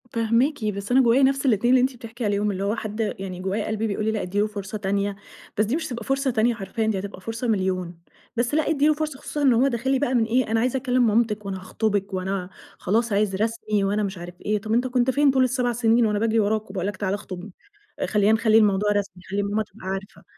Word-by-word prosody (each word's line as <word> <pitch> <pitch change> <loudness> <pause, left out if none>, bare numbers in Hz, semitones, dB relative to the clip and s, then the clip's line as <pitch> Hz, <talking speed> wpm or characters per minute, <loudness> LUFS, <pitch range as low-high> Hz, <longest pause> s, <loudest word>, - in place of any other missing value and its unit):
فاهماكِ، 230 +3 +1
بس 200 +1 -3
أنا 260 +2 +6
جوايا 250 +2 +4
نفس 275 +1 +2
الاتنين 240 -2 +3
اللي 255 - +6
أنتِ 260 +1 0
بتحكي 235 0 -7
عليهم، 205 0 +1
اللي 195 0 -3
هو 205 +2 0
حد 215 -1 -6 0.2
يعني 185 -2 -6
جوايا 195 +3 -2
قلبي 220 +1 -1
بيقول 210 0 -2
لي 220 - +2
لأ 215 - -2
ادّي 190 +3 -2
له 210 - +2
فرصة 210 0 -6
تانية 200 0 -1 0.4
بس 215 - +3
دي 230 +7 -1
مش 320 0 -2
هتبقى 240 -4 -5
فرصة 270 +2 0
تانية 235 +1 +2
حرفيًا 220 +2 -3
دي 210 -3 0
هتبقى 195 -1 -7
فرصة 225 +4 -4
مليون، 185 -5 -1 0.4
بس 240 +3 0
لأ 310 0 +2
ادّي 295 -2 +3
له 310 - +5
فرصة، 305 -3 -4
خصوصًا 295 0 -5
إن 270 -3 +5
هو 245 +4 +4
داخل 255 0 -1
لي 270 - +2
بقى 260 -2 0
من 240 -3 +3
إيه 230 0 +1
أنا 225 - +2
عايزة 250 +3 +1
أكلّم 250 -2 +2
مامتِك، 215 -1 +1
وأنا 195 -1 -4
هاخطُبِك 200 +1 -2
وأنا 185 0 -2 0.3
خلاص 230 +5 0
عايز 200 -1 +1
رسمي، 215 -1 -1
وأنا 205 +2 +1
مش 195 -1 -3
عارفة 175 +1 -9
إيه، 210 0 +1
طب 215 +1 -3
أنت 245 +2 +2
كنت 250 0 +1
فين 285 +1 +4
طول 260 -1 +3
ال7 250 -1 +1
سنين، 230 0 +3
وأنا 210 -1 +1
باجري 225 +1 +2
وراك 215 0 0
وباقول 190 -1 -3
لك 205 -1 -4
تعالَ 195 -1 -1
اخطُبني؟ 195 -1 -7 0.5
آآ - - 0
خلّينا 210 0 +2
نخلّي 220 0 +4
الموضوع 210 -1 +3
رسمي، 205 -2 -1
نخلّي 200 +2 -2
ماما 205 +2 0
تبقى 200 -2 -13
عارفة. 195 +3 -5
220 Hz, 245 wpm, -24 LUFS, 200-245 Hz, 0.5 s, أنا